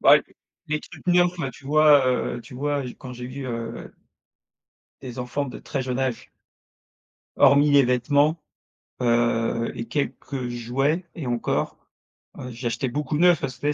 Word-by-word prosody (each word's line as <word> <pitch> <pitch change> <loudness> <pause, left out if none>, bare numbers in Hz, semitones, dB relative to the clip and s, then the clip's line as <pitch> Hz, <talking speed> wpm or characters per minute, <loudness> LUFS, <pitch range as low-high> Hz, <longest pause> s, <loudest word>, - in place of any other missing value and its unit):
Bah - - +8
les - - -1 0.5
les 155 -1 -1
trucs - - -14
neufs, 175 0 +3
heu, 135 - -2
tu 130 +2 -15
vois, 150 -2 +6
heu, 125 -1 0
tu 115 - -13
vois, 145 +1 -1
je 125 - -6
quand 125 -1 -10
j'ai 125 0 -7
vu, 130 +1 -6
heu 115 -1 -5 1.1
des 125 -1 -8
enfants 125 +3 -2
de 125 - -8
très 135 - -4
jeune 125 0 -3
âge 130 -3 -2 1.1
hormis 145 +1 +6
les 140 -1 +6
vêtements. 145 +5 +2 0.6
Heu, 115 -1 +1
et 115 - -4
quelques 140 -3 -3
jouets 135 +8 -1
et 160 -6 -5
encore. 120 -1 -1 0.6
Heu, 125 - -7
j'ai 120 +1 -4
acheté 120 +3 -1
beaucoup 145 +3 -2
neufs 175 -2 +5
parce 130 -2 -4
que 145 - -3
tu 150 - +2
130 Hz, 170 wpm, -24 LUFS, 120-145 Hz, 1.1 s, Bah